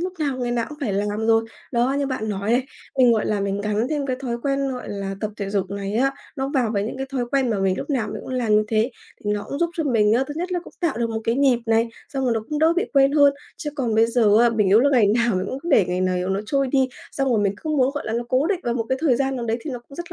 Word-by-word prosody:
lúc 365 +1 -2
nào 280 -4 -1
ngày 245 -1 -2
nào 235 -1 0
cũng 300 - -10
phải 240 -8 -1
làm 205 +2 -1
rồi. 225 0 +4 0.3
Đó, 240 +2 +2
như 280 - 0
bạn 255 -5 -3
nói 200 +1 -2
này, 250 +2 +2 0.3
mình, 245 -2 +6
gọi 220 - +1
là, 210 -1 0
mình 200 0 -1
gắn 210 +3 0
thêm 295 -2 -1
cái 255 -2 -1
thói 240 -3 -2
quen, 275 0 0
gọi 250 - -6
là, 195 -1 -4
tập 215 - -2
thể 200 -1 -4
dục 195 -2 -1
này 200 0 -4
á, 270 +4 +2 0.2
nó 270 0 -2
vào 250 -5 +2
với 200 - 0
những 230 - -5
cái 270 +1 -4
thói 250 -3 0
quen 270 -3 +2
mà 215 - 0
mình 190 -1 +1
lúc - - -5
nào 245 -6 0
mình - - -5
cũng - - -6
làm 240 -4 +1
như 215 - +5
thế 220 +3 +1 0.3
thì 205 - 0
nó 205 -1 -2
cũng 280 - -4
giúp 340 -1 +1
cho 320 - -1
mình 220 -5 +3
á, 255 +4 +3
thứ 290 - -5
nhất 360 +2 -3
là 355 - 0
cũng - - -14
tạo 325 -9 0
được 230 -1 0
một 225 - -2
cái 230 - +1
nhịp 265 -3 +3
này, 225 +1 +2 0.2
xong 270 -2 -2
rồi 245 - +2
nó 225 - 0
cũng 300 - -2
đỡ 320 +2 +4
bị 370 - +2
quên 275 -1 +4
hơn. 285 -2 +6 0.2
Chứ 295 - -4
còn 245 -6 -1
bây 225 +1 +5
giờ 225 -3 +4
á, 240 - +5
mình 220 -3 +1
yếu 205 +4 +6
là 285 +3 +3
ngày 245 -6 +4
nào 235 -3 +2
mình 185 - -2
cũng 275 - -5
để 215 -9 +5
ngày 180 +1 -1
này 185 -1 0
nó 195 +1 0
trôi 275 +1 +1
đi, 265 0 +2 0.2
xong 270 -1 0
rồi 230 - +3
mình 200 -1 +1
cứ 315 - -3
muốn, 270 -4 +3
gọi 290 - -4
là, 220 - -2
nó 235 +1 -1
cố 260 +4 +2
định 370 -1 0
vào 240 0 -1
một 230 -2 -1
cái 260 0 0
thời 290 -7 +3
gian 270 +1 0
nào 240 - -3
đấy 225 0 0
thì 310 - -6
nó 250 - -4
cũng 275 - -13
rất 345 0 -7
240 Hz, 325 wpm, -22 LUFS, 215-275 Hz, 0.3 s, mình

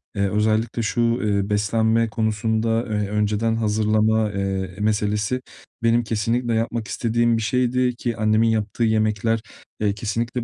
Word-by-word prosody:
Eee, 100 -1 +1
özellikle 110 +3 0
şu, 115 +2 -1
eee, 105 -4 +1
beslenme 110 +2 +1
konusunda, 110 +1 0
eee, 105 -2 -1
önceden 105 +2 0
hazırlama, 110 0 +1
eee, 95 -2 -3
meselesi 105 +3 0 0.4
benim 115 +1 +3
kesinlikle 115 +2 -1
yapmak 115 0 -1
istediğim 120 0 +1
bir - - -2
şeydi 125 +1 +1
ki 120 -1 -3
annemin 110 +1 +3
yaptığı 110 +1 -1
yemekler, 110 0 +1 0.4
eee, 105 -2 +1
kesinlikle 115 +3 -2
110 Hz, 130 wpm, -22 LUFS, 105-115 Hz, 0.4 s, benim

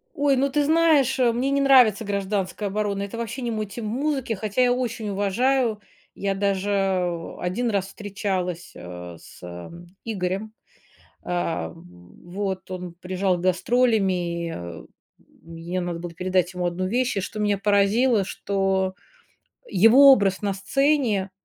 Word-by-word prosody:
Ой, 285 -1 +2
ну, 275 +2 +1
ты 290 +2 +1
знаешь, 305 -4 +3
э, 245 -2 +4
мне 245 +4 -1
не 280 0 +2
нравится 250 -6 +5
"Гражданская 200 0 -2
оборона", 200 0 -1
это 200 +3 -6
вообще 235 +3 -4
не 240 -1 -2
мой 215 -1 -2
тип 210 +3 -8
музыки, 265 +2 -1
хотя 215 +3 -1
я 245 -1 +4
очень 240 -3 -3
уважаю. 220 +4 +1 0.4
Я 195 0 -1
даже 195 -3 -1
1 230 +7 -1
раз 195 -2 0
встречалась, 190 -4 -4
а, 90 -1 -9
с - - -16
э, 85 0 -8 0.3
Игорем. 195 0 -3 0.7
А, 165 - -2
вот 175 - -7
он 180 -2 -6
приезжал 185 0 0
с - - -6
гастролями, 180 - 0 0.3
мне 165 +2 -7
надо 175 -1 -3
было 170 0 -7
передать 185 +1 0
ему 180 0 -2
1 175 +2 -2
вещь, 245 +4 0
и, - - +1
что 210 +3 -5
меня 205 -1 +1
поразило, 205 +3 +3
что 190 -1 -1 0.7
его 250 +8 +7
образ 195 -6 +2
на 200 -1 0
сцене 220 -1 +1
200 Hz, 145 wpm, -24 LUFS, 180-235 Hz, 0.7 s, его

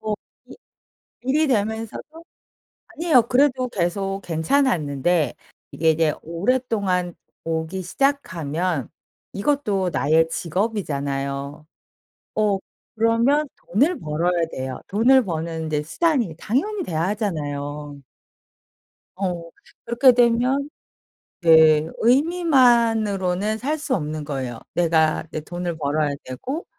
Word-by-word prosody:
어 215 -1 -2 0.3
이 - - -13 0.7
일이 290 +5 +1
되면서도 225 +7 -3 0.6
아니에요 330 -7 +3
그래도 255 +1 +2
계속 195 -1 -2
괜찮았는데 160 - +1 0.4
이게 160 +1 +2
이제 160 -1 +1
오랫동안 190 -1 0 0.3
오기 165 +3 -3
시작하면 180 - -1 0.4
이것도 205 -5 0
나의 160 +3 +3
직업이잖아요. 145 -7 -3 0.7
어 210 -2 +2 0.4
그러면 230 +7 +2
돈을 285 - +1
벌어야 165 +3 0
돼요. 130 -1 -5
돈을 250 +6 +4
버는 165 -2 -3
이제 150 -1 -1
수단이 240 - 0
당연히 375 - -1
돼야 160 -2 -2
하잖아요. 145 -8 -4 1.1
어 180 -2 -2 0.4
그렇게 240 +3 +5
되면 250 +4 +2 0.7
네 160 -2 +6
의미만으로는 230 - +2
살 290 +7 -2
수 290 -3 -1
없는 155 -3 -4
거예요. 130 -5 -4
내가 160 -3 +2
내 - - -3
돈을 175 +1 -5
벌어야 150 0 0 0.2
되고 260 - -5
185 Hz, 235 characters per minute, -22 LUFS, 160-245 Hz, 1.1 s, 네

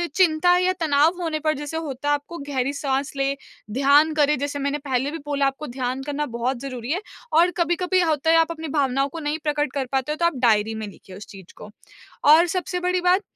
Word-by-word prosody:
चिंता 355 -1 +4
या 365 +1 +2
तनाव 315 +4 +2
होने 320 -2 -2
पर 310 0 +1
जैसे 295 +2 -5
होता 290 -2 -3
आपको 290 +4 -3
गहरी 270 0 -1
साँस 275 -1 -2
लें, 275 0 0 0.4
ध्यान 280 +5 +4
करें 300 -1 +2
जैसे 285 +1 -3
मैंने 280 +1 -1
पहले 270 0 -1
भी 330 - -5
बोला 285 -1 0
आपको 275 +3 -4
ध्यान 255 +1 -3
करना 290 +1 -2
बहुत 245 +1 -1
ज़रूरी 255 -2 -5
है 360 +5 -1 0.4
और 350 +1 +4
कभी-कभी 355 +2 +1
होता 320 -2 +1
है, - - +5
आप 330 0 +3
अपनी 320 -1 -6
भावनाओं 275 0 +1
को 330 - -7
नहीं 300 0 -2
प्रकट 295 -2 0
कर 275 -2 -1
पाते 270 +2 -1
हो, - - -1
तो 340 - +1
आप 340 -4 +1
डायरी 220 0 +2
में 220 -1 -5
लिखिए 190 -1 -13
उस 210 - -10
चीज़ 190 -3 -13
को। 210 - -10 0.6
और 315 +4 +7
सबसे 360 +1 -3
बड़ी 360 0 0
बात 360 +3 +3
290 Hz, 220 wpm, -23 LUFS, 270-330 Hz, 0.6 s, और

